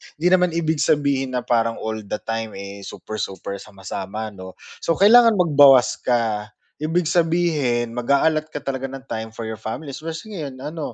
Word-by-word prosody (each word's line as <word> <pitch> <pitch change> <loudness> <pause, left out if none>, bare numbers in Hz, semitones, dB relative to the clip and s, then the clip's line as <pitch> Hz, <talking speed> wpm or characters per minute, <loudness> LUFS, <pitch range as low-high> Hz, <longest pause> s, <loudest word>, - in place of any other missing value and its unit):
Hindi 165 +4 0
naman 180 -2 +3
ibig 160 -2 0
sabihin 140 -4 +1
na 125 - -1
parang 115 -1 +1
all 110 0 -3
the - - -2
time 115 -1 -4
eh, 100 +1 -8
super-super, 100 -1 -6
sama-sama 100 +2 -6
’no? 95 -2 -10 0.2
So 165 - 0
kailangan 230 +5 +7
magbawas 140 - +5
ka. 115 -4 0 0.3
Ibig 160 +2 0
sabihin 160 -9 +1
mag-aallot 155 +5 +1
ka 145 - -4
talaga 135 -1 -3
ng 135 0 -7
time 110 -1 -5
for 110 0 -6
your 110 - -5
family 110 +8 -6
especially 165 +9 -7
ngayon 135 -5 -6
ano, 155 0 -5
135 Hz, 165 wpm, -22 LUFS, 110-160 Hz, 0.3 s, kailangan